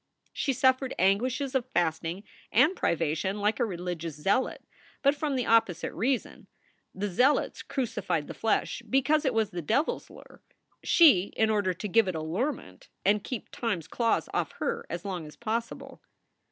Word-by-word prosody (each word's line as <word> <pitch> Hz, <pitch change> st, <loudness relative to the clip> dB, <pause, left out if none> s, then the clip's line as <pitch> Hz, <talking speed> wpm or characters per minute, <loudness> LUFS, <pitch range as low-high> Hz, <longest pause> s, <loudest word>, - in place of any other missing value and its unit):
She 275 Hz, -, 0 dB
suffered 260 Hz, 0 st, +2 dB
anguishes 250 Hz, +9 st, +1 dB
of 255 Hz, -2 st, -1 dB
fasting 170 Hz, +2 st, 0 dB, 0.3 s
and 300 Hz, -, +4 dB
privation 170 Hz, -, -1 dB
like 210 Hz, +4 st, +1 dB
a 240 Hz, -, +3 dB
religious 175 Hz, -5 st, -4 dB
zealot, 195 Hz, +12 st, 0 dB, 0.4 s
but 280 Hz, 0 st, +5 dB
from 290 Hz, -1 st, -2 dB
the 250 Hz, -2 st, 0 dB
opposite 225 Hz, -7 st, +2 dB
reason: 245 Hz, +7 st, -2 dB, 0.5 s
the 200 Hz, +2 st, -2 dB
zealots 250 Hz, +9 st, +2 dB
crucified 225 Hz, -, -2 dB
the -, -, -7 dB
flesh 225 Hz, -, 0 dB
because 295 Hz, +4 st, +2 dB
it 260 Hz, -, +2 dB
was 220 Hz, -2 st, +1 dB
the 175 Hz, -, -4 dB
devil 230 Hz, -, +1 dB
s -, -, -17 dB
lure; -, -, -15 dB, 0.4 s
she 290 Hz, -, +6 dB
in 220 Hz, 0 st, +3 dB
order 200 Hz, -4 st, +1 dB
to 210 Hz, -, -5 dB
give 215 Hz, +2 st, +3 dB
it 185 Hz, -, -2 dB
allurement 160 Hz, -, -4 dB, 0.2 s
and 205 Hz, +1 st, +3 dB
keep 250 Hz, -5 st, -6 dB
time 230 Hz, -6 st, -1 dB
s 165 Hz, -, -10 dB
claws 230 Hz, +2 st, 0 dB
off -, -, -1 dB
her 470 Hz, -1 st, -3 dB
as 170 Hz, +2 st, -5 dB
long 180 Hz, -5 st, -4 dB
as 150 Hz, -, -13 dB
possible. 230 Hz, 0 st, -4 dB
220 Hz, 165 wpm, -28 LUFS, 180-260 Hz, 0.5 s, she